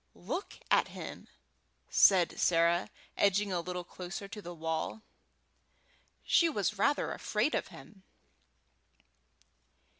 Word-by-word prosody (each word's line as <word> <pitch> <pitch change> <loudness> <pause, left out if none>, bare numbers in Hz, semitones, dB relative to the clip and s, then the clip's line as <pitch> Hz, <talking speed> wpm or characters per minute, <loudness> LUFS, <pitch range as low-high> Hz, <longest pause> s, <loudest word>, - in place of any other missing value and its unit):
"Look 395 - -5
at - - +4
him!" - - -8 0.6
said 185 -3 +5
Sarah, 170 +1 +3 0.3
edging 200 0 +2
a 175 - 0
little 180 +1 -5
closer 180 +3 -7
to 210 +1 -8
the 175 - -8
wall; 160 +5 -3 1.2
she 335 - +4
was 210 -6 -1
rather 285 +7 +2
afraid - - -1
of - - -1
him. 200 -3 -14
185 Hz, 110 wpm, -32 LUFS, 175-205 Hz, 1.2 s, said